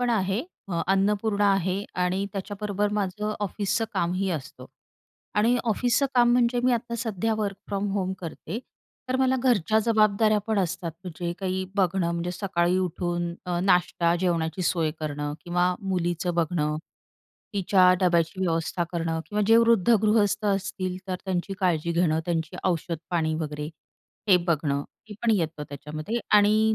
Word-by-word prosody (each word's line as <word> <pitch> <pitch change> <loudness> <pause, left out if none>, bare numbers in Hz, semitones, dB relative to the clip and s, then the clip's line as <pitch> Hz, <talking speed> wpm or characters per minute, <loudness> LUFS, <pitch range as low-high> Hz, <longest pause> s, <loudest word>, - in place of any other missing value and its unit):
पण 245 -1 +1
आहे. 195 -1 +1 0.3
अ, 170 -2 -1
अन्नपूर्णा 205 +1 +2
आहे 195 +1 0 0.2
आणि 185 +2 0
त्याच्याबरोबर 205 +1 -2
माझं 210 +2 -2
ऑफिसचं 205 +2 -1
कामही 185 +3 0
असतं 155 -6 -6 0.7
आणि 235 +4 +4
ऑफिसचं 245 +4 +2
काम 240 -1 +5
म्हणजे 245 0 +3
मी 255 - +4
आता 235 0 -2
सध्या 225 -1 -1
वर्क 200 -2 -2
फ्रॉम 200 0 -2
होम 190 -2 -1
करते. 170 +3 -6 0.5
तर 255 - +1
मला 260 0 +2
घरच्या 220 -4 +3
जबाबदाऱ्या 215 -1 +3
पण 220 -2 +1
असतात. 180 -2 -1
म्हणजे 175 -1 -4
काही 190 -1 -2
बघणं, 185 -2 +2
म्हणजे 170 +1 -2
सकाळी 180 -2 0
उठून 175 -1 -2
अ, 175 -1 -1
नाष्टा, 180 -2 +2
जेवणाची 170 -1 0
सोय 165 -3 +1
करणं 145 -1 -3
किंवा 175 +1 +1
मुलीचं 175 -2 -1
बघणं. 155 -2 0 0.8
तिच्या 185 -1 +5
डब्याची 175 0 +2
व्यवस्था 170 0 0
करणं 165 -1 -1
किंवा 210 0 -1
जे 225 +1 +6
वृद्ध 230 -3 +4
गृहस्थ 210 -1 +2
असतील 190 -2 -1
तर 185 - -2
त्यांची 190 0 -2
काळजी 170 -3 +1
घेणं, 165 -2 +2
त्यांची 170 +1 -2
औषधपाणी 165 -2 -1
वगैरे 150 -2 -4 0.6
हे 190 - +8
बघणं. 145 -3 +1 0.3
हे 210 - -8
पण 235 - +3
येतं 165 -5 -2
त्याच्यामध्ये 155 - -4 0.2
आणि 215 +1 +4
185 Hz, 145 wpm, -26 LUFS, 170-210 Hz, 0.8 s, हे